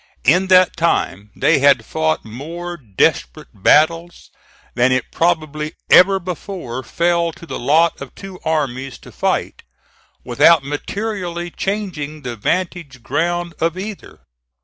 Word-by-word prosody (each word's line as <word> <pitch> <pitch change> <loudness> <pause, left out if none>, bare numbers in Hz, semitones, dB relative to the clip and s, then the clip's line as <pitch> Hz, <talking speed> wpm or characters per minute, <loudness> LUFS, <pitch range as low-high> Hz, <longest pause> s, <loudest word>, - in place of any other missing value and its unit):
In 180 +7 +3
that 185 -1 +5
time 105 - 0
they - - +3
had 135 -4 +4
fought 80 0 -1
more 165 +10 -7
desperate 100 - -1
battles 165 - +2 0.4
than 125 +1 +2
it 130 -1 -1
probably 155 -2 -1 0.2
ever 195 +1 +7
before 175 - -6
fell 170 +5 0
to 170 - -13
the - - -6
lot 160 +6 +2
of 140 - -9
two 195 -2 -10
armies 135 -4 -2
to - - -15
fight, - - -2 0.6
without 165 -4 +4
materially 175 +3 -4
changing 155 -8 -4
the 120 -2 -5
vantage 160 - -3
ground 170 +6 -1
of 165 +2 0
either. 200 +1 -8
165 Hz, 125 wpm, -19 LUFS, 135-175 Hz, 0.6 s, ever